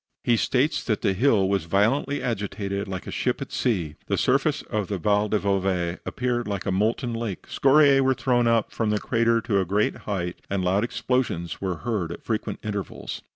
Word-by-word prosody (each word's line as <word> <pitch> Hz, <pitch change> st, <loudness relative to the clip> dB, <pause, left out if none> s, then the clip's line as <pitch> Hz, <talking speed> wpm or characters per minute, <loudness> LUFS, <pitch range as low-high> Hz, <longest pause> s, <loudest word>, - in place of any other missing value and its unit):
He 120 Hz, -, +3 dB
states 130 Hz, +6 st, +1 dB
that 110 Hz, -3 st, -1 dB
the 95 Hz, -, +3 dB
hill 105 Hz, -2 st, +3 dB
was 100 Hz, -4 st, 0 dB
violently 115 Hz, +11 st, +1 dB
agitated, 100 Hz, -3 st, -3 dB
like 95 Hz, -1 st, -5 dB
a -, -, -6 dB
ship -, -, -1 dB
at -, -, -6 dB
sea. 85 Hz, -11 st, -1 dB
The -, -, 0 dB
surface -, -, +1 dB
of 105 Hz, -3 st, -2 dB
the 100 Hz, -, -2 dB
Val 105 Hz, +3 st, +1 dB
del 105 Hz, -2 st, +1 dB
Bove 95 Hz, -3 st, 0 dB
appeared 120 Hz, -1 st, -1 dB
like 100 Hz, -2 st, -3 dB
a 95 Hz, -, 0 dB
molten 115 Hz, +5 st, 0 dB
lake; 115 Hz, -5 st, -4 dB
scoriae 140 Hz, 0 st, +5 dB
were 130 Hz, 0 st, +3 dB
thrown 120 Hz, -2 st, +2 dB
up 115 Hz, -1 st, +2 dB
from 110 Hz, -2 st, -1 dB
the 105 Hz, 0 st, +1 dB
craters 115 Hz, -1 st, +1 dB
to 100 Hz, -4 st, +2 dB
a -, -, +2 dB
great 100 Hz, +4 st, +1 dB
height, 90 Hz, -3 st, -2 dB
and 95 Hz, -1 st, -1 dB
loud 95 Hz, +4 st, +2 dB
explosions 120 Hz, -8 st, -1 dB
were 95 Hz, -2 st, -1 dB
heard 105 Hz, -8 st, -1 dB
at -, -, -8 dB
frequent 110 Hz, -2 st, -2 dB
intervals. 105 Hz, -3 st, -5 dB
105 Hz, 200 wpm, -25 LUFS, 95-120 Hz, -, scoriae